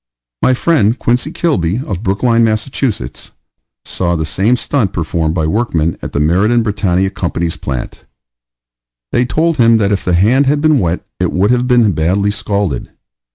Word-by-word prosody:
My 130 - +3
friend 125 -7 +2
Quincy 120 +5 0
Kilby, 125 - 0
of 95 -3 -4
Brookline, 115 +4 +1
Mass., 110 0 0 1.2
saw 85 -1 -1
the 80 -1 -2
same 95 +10 +1
stunt 125 -5 -1
performed 80 -1 -1
by 80 -3 0
workmen 85 -4 0
at - - -6
the - - -2
Meridan 100 +10 +2
Brittania 95 -3 0
Company's 85 -2 -2
plant. 65 -3 -6 1.1
They 120 - +2
told 160 +5 0
him 115 -2 +5
that 100 -2 +1
if 100 - -1
the 90 - +1
hand 120 +10 +3
had 145 +1 +2
been 155 -2 +3
wet 85 -1 -2
it - - 0
would 100 +5 +1
have 125 0 +1
been 120 -4 +4
badly 95 +5 0
scalded. 100 - -2
105 Hz, 160 wpm, -14 LUFS, 85-120 Hz, 1.2 s, him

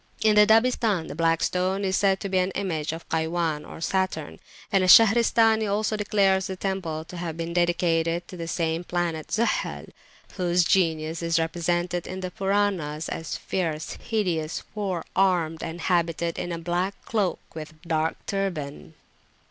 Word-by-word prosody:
In 215 -1 +5
the 210 0 +6
Dabistan 225 -5 +3
the - - -5
Black 165 +1 +1
Stone 185 +2 0
is 190 0 +1
said 195 -1 +2
to - - -3
be 190 -1 +1
an 185 +1 +1
image 165 -7 -2
of 165 +1 -8
Kaywan 160 -1 -1
or - - -10
Saturn; 185 -4 -2 0.3
and 195 -2 +3
Al - - +2
Shahristani 225 0 +6
also 215 +1 0
declares 195 -2 +2
the 190 - -4
temple 180 -5 -3
to 180 - -9
have 165 -2 -4
been 170 0 -4
dedicated 170 -1 +1
to - - -9
the 165 -2 -5
same 165 0 -1
planet 170 -3 -2
Zuhal, 230 +2 -1 0.5
whose 175 -1 +2
genius 165 -3 +1
is 165 -1 +1
represented 175 +1 -1
in 185 +1 -5
the 185 -1 -4
Puranas 190 -6 -1
as 160 - -4
fierce, 160 -4 -3
hideous, 175 -8 -1
four 195 -5 -3
armed, 175 -4 +2
and 170 +1 -5
habited 170 -1 0
in 175 - -3
a 170 - -2
black 175 +4 -1
cloak, 205 -5 0 0.2
with 155 -1 -8
a 155 +2 -20
dark 160 -1 0
turband. 165 -7 -4
175 Hz, 165 wpm, -25 LUFS, 165-195 Hz, 0.5 s, the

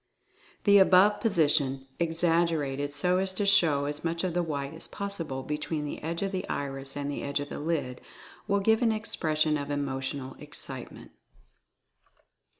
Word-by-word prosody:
The 200 -1 +7
above 190 +2 +6
position, 145 - +2
exaggerated 165 -4 +1
so 180 +5 +2
as 190 0 +2
to 205 - 0
show 160 -8 +4
as 145 +1 -3
much 170 +1 -1
of 185 -2 -1
the 175 - +1
white 145 -3 -3
as 160 - -7
possible 165 -10 -5
between 150 +1 -3
the 145 - -6
edge 165 +3 -3
of 195 - -1
the 190 -1 -4
iris 135 0 -4
and 145 0 -2
the - - -4
edge 140 0 -1
of 145 0 -5
the - - -6
lid, 145 -5 -2 0.5
will 200 0 +2
give 220 +3 +3
an 230 -2 +3
expression 155 -8 0
of 140 0 -5
Emotional 135 -1 -3
Excitement. - - -8
155 Hz, 160 wpm, -28 LUFS, 140-185 Hz, 0.5 s, The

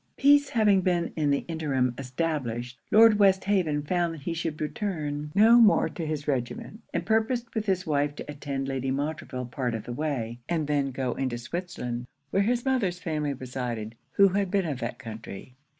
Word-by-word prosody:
Peace 285 0 +5
having 210 -4 +4
been 175 -2 0
in 150 -2 +1
the 140 0 +1
interim 140 -7 0
established, 125 -3 -3
Lord 220 -1 +7
Westhaven 190 -6 +3
found 170 +1 0
he 155 +3 -4
should 160 -2 -3
return 150 -3 -3
no 225 +4 +7
more 215 -2 +5
to 165 -3 -5
his 150 -1 -3
regiment, 135 - -3
and - - -2
purposed 230 +2 0
with 215 -1 -2
his 185 -2 +1
wife 145 -1 0
to - - -7
attend 140 -2 -4
Lady 135 -1 -2
Montreville 140 -2 -3
part 125 -1 -2
of 110 - -5
the 120 - -6
way, 120 -5 -3
and 165 -3 0
then 145 -1 +1
to 135 - -4
go 130 -1 -2
into 130 -3 -2
Switzerland, 125 -4 -5 0.2
where 195 - +3
his 240 +4 +1
mother's 230 -10 +1
family 155 -5 -2
resided, 120 -4 -4 0.2
who 200 0 +6
had 195 0 0
been 195 -1 +1
of 145 -6 -3
that - - -4
country. 110 -2 -9
150 Hz, 180 wpm, -27 LUFS, 130-190 Hz, 0.2 s, Lord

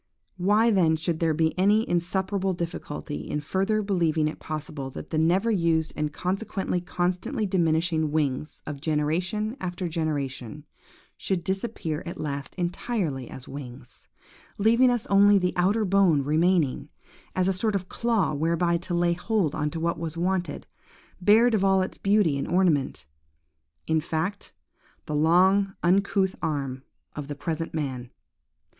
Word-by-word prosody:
Why 210 +5 +3
then 170 -6 +3
should 160 +1 -2
there 160 -2 +1
be 160 0 +1
any 210 +4 +3
insuperable 190 +2 0
difficulty 165 -3 -5
in 150 - -1
further 195 +8 0
believing 165 -6 +1
it 155 - -5
possible 155 -3 -5
that - - -9
the 155 - +1
never 185 +8 +2
used 165 -5 +1
and 150 0 -2
consequently 190 +1 -2
constantly 185 +7 -1
diminishing 165 -4 +1
wings 150 -1 -2
of 145 -2 -6
generation 175 - -1
after 180 0 -3
generation, 150 -4 -3 0.5
should 185 -3 -2
disappear 190 -5 -2
at 170 - -6
last 140 -3 -4
entirely 175 - -2
as 130 - -10
wings, 125 -3 -10 0.5
leaving 235 +5 +4 0.2
only 200 +1 +6
the 180 -1 0
outer 200 +5 +2
bone 185 -7 +3
remaining, 160 0 +1 0.5
as 185 0 +2
a 195 - +2
sort 205 +3 -1
of 185 -2 -2
claw 230 -6 0
whereby 170 +3 +1
to 175 +1 -4
lay 175 0 +2
hold 180 -3 0
on 150 -1 -1
what 165 +1 -2
was 165 -1 -5
wanted–bared 190 +5 0
of 205 -3 +2
all 190 -1 +4
its 185 - -7
beauty 195 -8 +2
and - - -3
ornament,–in 80 - -2
fact, 165 +5 -3 0.5
the 150 - -4
long 185 +6 +3
uncouth 190 +1 +2
arm 135 -4 -2 0.3
of 145 -2 -5
the 145 - -5
present 165 +2 -4
man? 130 -5 -3
170 Hz, 140 wpm, -26 LUFS, 150-190 Hz, 0.5 s, only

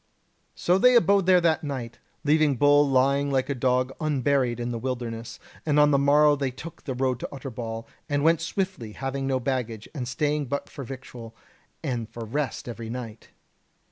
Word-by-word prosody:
"So 180 +2 +2
they 250 +4 +6
abode 200 -5 +4
there 185 -1 +7
that 165 -2 +2
night, 130 -5 -5 0.2
leaving 150 -1 +3
Bull 145 +2 +5
lying 140 +2 +3
like 135 -1 0
a - - +1
dog 130 0 +1
unburied 135 -5 +1
in 120 0 -2
the 115 - -3
wilderness; 120 -2 -4 0.3
and 150 -1 +2
on 150 0 +6
the 140 - +4
morrow 145 +1 +5
they 140 -2 -1
took 150 +6 -10
the 130 - -3
road 130 -1 0
to - - -5
Utterbol, 115 -4 -6 0.2
and 145 0 0
went 165 0 +4
swiftly, 165 - -3
having 135 +1 -3
no 130 -1 +1
baggage, 120 -4 -3
and 130 -6 -4
staying 145 +3 -1
but 140 +3 -3
for 140 - -7
victual, 120 -3 -9 0.5
and 120 -4 -3
for 115 -1 -7
rest 140 +4 -3
every 115 -1 -6
night. 115 -2 -7
135 Hz, 180 wpm, -26 LUFS, 120-145 Hz, 0.5 s, there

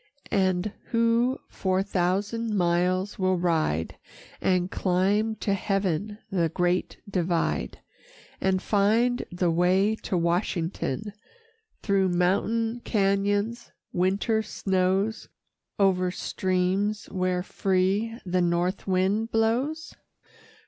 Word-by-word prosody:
And 190 0 +1
who 230 +3 +2
four 190 0 0
thousand 205 +4 -1
miles 180 +3 +1
will 185 -1 +2
ride 160 - 0 0.4
And 180 -1 +1
climb 200 +4 +1
to 205 -2 -1
heaven 195 0 -1
the 170 -4 +1
Great 180 +2 0
Divide, 175 -3 -1 0.6
And 190 -1 +1
find 225 +4 +2
the 175 -1 +1
way 185 +5 +3
to 185 - -2
Washington, 170 +1 -1 0.7
Through 195 -2 +2
mountain 220 +6 +1
cañons, 205 +2 0 0.2
winter 195 +5 +1
snows, 195 +1 -1 0.5
O'er 185 -2 +3
streams 185 +3 -1
where 185 -1 0
free 195 +5 0
the 180 0 +1
north 175 +3 0
wind 195 +4 +1
blows? 250 +9 0
190 Hz, 95 wpm, -26 LUFS, 180-215 Hz, 0.7 s, way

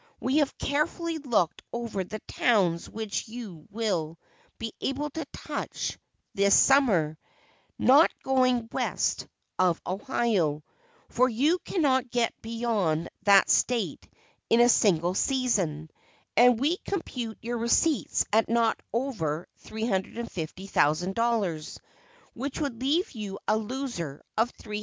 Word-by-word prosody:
We 260 +3 0
have 290 -3 +1
carefully 320 +3 -1
looked 235 - 0
over 235 -5 -3
the 215 +4 -7
towns 185 -8 +1
which 220 0 -4
you 215 -9 -9
will 190 -8 -2 0.4
be 225 -1 -5
able 290 +2 -2
to 320 +1 -5
touch - - -5 0.3
this 200 0 +4
summer, 190 - +4 0.6
not 285 +6 +6
going 255 -3 +2
west - - -1 0.3
of 180 -2 +3
Ohio, 190 - 0 0.5
for 255 +2 +3
you 290 +10 +2
cannot 265 -9 +1
get 235 -1 0
beyond 220 -8 -1 0.2
that 200 -1 +7
State 245 -2 +1 0.4
in 230 - +4
a 240 0 +6
single 180 -6 +3
season, 190 - 0 0.4
and 245 -1 +6
we 305 +7 +1
compute 250 - -4
your 235 +1 -4
receipts 240 +4 +2
at 220 0 +3
not 230 -1 +2
over 180 - -2 0.2
$350,000, 190 -3 -1 0.5
which 270 +3 -4
would 270 -6 -3
leave 315 +9 +1
you 210 -4 -6
a 215 - +3
loser 220 - -4
of 230 +3 +1
$370,000." 210 -1 -6
230 Hz, 120 wpm, -27 LUFS, 190-255 Hz, 0.6 s, that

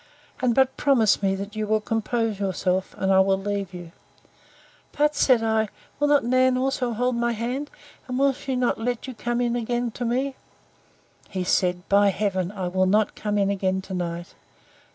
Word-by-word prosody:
And 245 -2 +2
but 265 -1 +2
promise 235 -9 +3
me, 195 -1 +1
that 200 +2 -7
you 215 -1 -2
will 215 +1 +2
compose 225 0 -1
yourself, 190 -1 -1
and 190 0 +1
I 190 - +6
will 190 0 +3
leave 200 -1 -3
you. 175 -2 -9 1.1
But, 295 +1 +3
said 255 -5 +3
I, 220 -1 +1 0.3
will 290 - +2
not 290 -1 +4
Nan 255 +1 +3
also 255 -2 0
hold 250 +2 0
my 235 0 0
hand? 250 +6 -3 0.4
And 250 -1 -3
will 275 +1 +4
not - - -14
she 265 -1 -3 0.3
let 245 0 -2
you 260 - -6
come 240 +1 -2
in 240 -1 0
again 240 0 -1
to 245 - -6
me?—He 245 -6 -6
said, 180 0 0
By 200 0 +5
heaven! 190 -2 -1
I 190 -3 -4
will 185 +1 +1
not 210 +2 +2
come 210 -1 -2
in 200 -1 +2
again 190 -1 0
to 190 - -8
night. 175 -1 -4
220 Hz, 185 wpm, -24 LUFS, 195-250 Hz, 1.1 s, I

